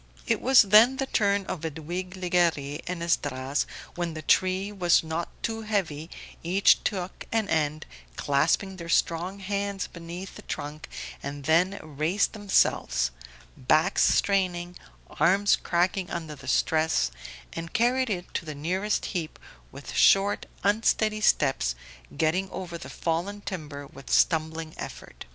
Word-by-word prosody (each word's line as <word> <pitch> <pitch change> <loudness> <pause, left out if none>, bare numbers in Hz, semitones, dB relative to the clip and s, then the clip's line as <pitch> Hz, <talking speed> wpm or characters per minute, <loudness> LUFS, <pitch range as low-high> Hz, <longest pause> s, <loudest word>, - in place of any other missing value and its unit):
It - - 0
was 265 -1 +7
then 220 +6 +6
the 270 - 0
turn 200 -5 +1
of 175 - -5
Edwige 170 +4 -5
Legare 170 -5 0
and 175 -1 -3
Esdras; 140 -4 0 0.3
when 175 -2 -3
the 155 - -6
tree 185 +5 +2
was 180 -5 +3
not 160 +1 -3
too 225 0 -2
heavy 180 -8 -2 0.3
each 185 +4 +4
took 185 -3 -3
an 225 -2 +1
end, 155 -3 0 0.3
clasping 165 - +1
their 170 -2 -8
strong 170 +4 +1
hands 200 0 -2
beneath 170 +3 -8
the - - -10
trunk, 150 -1 -6 0.3
and 140 0 -6
then 175 +6 +3
raised 155 +6 0
themselves 65 - +1 0.4
backs 155 +9 +2
straining, 180 -3 0 0.4
arms 195 +6 +4
cracking 180 +1 0
under 165 -3 -5
the 135 -2 -12
stress 155 - +2 0.4
and 165 0 -6
carried 250 +2 +2
it 180 -4 -4
to - - -2
the 155 -2 -6
nearest 185 +8 -1
heap 165 -4 -3 0.3
with - - -9
short 195 +1 +4 0.2
unsteady 215 +1 +2
steps, 135 - +2 0.4
getting 180 +5 +1
over 180 -3 -6
the 170 - -8
fallen 175 +5 -2
timber 155 -8 -6
with 135 0 -13
stumbling 160 -1 +1
effort. - - -8
175 Hz, 135 wpm, -27 LUFS, 155-195 Hz, 0.4 s, was